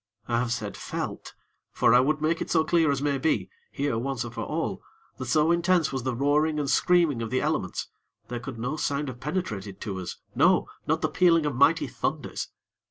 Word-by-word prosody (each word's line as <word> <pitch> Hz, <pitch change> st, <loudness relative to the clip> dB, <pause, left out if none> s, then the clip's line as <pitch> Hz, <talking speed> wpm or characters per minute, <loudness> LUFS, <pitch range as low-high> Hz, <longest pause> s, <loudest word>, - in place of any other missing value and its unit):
I 115 Hz, -1 st, +1 dB
have 120 Hz, -1 st, -1 dB
said 110 Hz, -4 st, -3 dB
"felt"; -, -, -5 dB, 0.4 s
for -, -, +3 dB
I 125 Hz, -, +8 dB
would 150 Hz, +4 st, +1 dB
make 160 Hz, +1 st, +1 dB
it -, -, -3 dB
so 160 Hz, -2 st, +3 dB
clear 165 Hz, -3 st, +3 dB
as 140 Hz, 0 st, 0 dB
may 140 Hz, -2 st, +1 dB
be, 160 Hz, +4 st, 0 dB, 0.2 s
here 140 Hz, -5 st, -1 dB
once 130 Hz, 0 st, -2 dB
and 120 Hz, 0 st, -7 dB
for -, -, -4 dB
all, -, -, -3 dB, 0.4 s
that 130 Hz, -, -4 dB
so 155 Hz, +5 st, +3 dB
intense 170 Hz, -2 st, +2 dB
was 135 Hz, -, -1 dB
the 130 Hz, 0 st, -2 dB
roaring 150 Hz, +4 st, +2 dB
and 145 Hz, -, -1 dB
screaming 170 Hz, -5 st, +3 dB
of 115 Hz, -, -3 dB
the 130 Hz, -, +1 dB
elements, -, -, -1 dB, 0.4 s
there 120 Hz, 0 st, -4 dB
could 125 Hz, 0 st, -7 dB
no 125 Hz, +7 st, -3 dB
sound 145 Hz, -1 st, -1 dB
have 120 Hz, -1 st, -8 dB
penetrated 110 Hz, -, -4 dB
to 95 Hz, -3 st, -4 dB
us, 90 Hz, -1 st, -6 dB, 0.2 s
no! -, -, +4 dB, 0.2 s
not -, -, +1 dB
the -, -, +4 dB
pealing 165 Hz, -3 st, +4 dB
of 145 Hz, -4 st, -1 dB
mighty 140 Hz, +5 st, +4 dB
thunders. 135 Hz, +4 st, -3 dB
140 Hz, 210 wpm, -27 LUFS, 120-155 Hz, 0.4 s, I